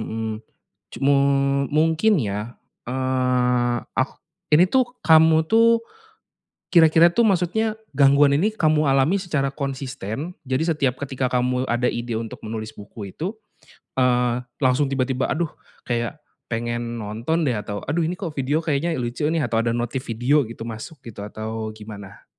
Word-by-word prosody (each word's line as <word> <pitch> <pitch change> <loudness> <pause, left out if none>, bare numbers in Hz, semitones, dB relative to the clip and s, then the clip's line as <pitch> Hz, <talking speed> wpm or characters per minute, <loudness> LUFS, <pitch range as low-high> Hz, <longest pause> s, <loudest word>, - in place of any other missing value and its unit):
Mhm, 110 0 -4 0.5
cumu 140 +1 +2 0.6
mungkin 160 +8 +3
ya, 105 +2 -4 0.3
eee, 125 -1 +1 0.2
ak 130 +2 +1 0.4
ini 175 +4 +6
tuh 260 +3 +4 0.2
kamu 160 0 +6
tuh 230 +1 +5 0.9
kira-kira 165 0 +6
tuh 230 +6 +3
maksudnya 205 +3 +1 0.2
gangguan 140 +1 +5
ini 210 +6 +1
kamu 155 -6 +2
alami 135 +7 +3
secara 150 -8 -1
konsisten, 135 - -5
jadi 135 +6 0
setiap 135 -4 +1
ketika 135 -2 -2
kamu 125 +1 +1
ada 120 +1 +1
ide 120 0 -4
untuk 110 0 -5
menulis 110 0 -5
buku 100 0 -9
itu, 185 +7 -3 0.7
eee, 125 -1 +2 0.2
langsung 130 +3 +3
tiba-tiba, 130 -1 -1
"Aduh 165 -1 -1 0.3
kayak 120 +4 -2 0.3
pengen 120 0 -3
nonton 115 +10 -2
deh, 125 - +1
atau, 105 -2 -4
aduh 155 +5 0
ini 170 +3 -1
kok 175 -6 -5
video 140 +1 0
kayaknya 160 0 -1
lucu 120 +1 -4
nih," 160 -4 +1
atau, 115 -1 +1
ada 115 - 0
notif 120 +2 -2
video 125 +6 +2
gitu 115 -1 -8
masuk 115 +8 -7
gitu 115 -3 -8
atau 110 +1 -5
gimana? 105 -2 -11
130 Hz, 145 wpm, -23 LUFS, 120-160 Hz, 0.9 s, ini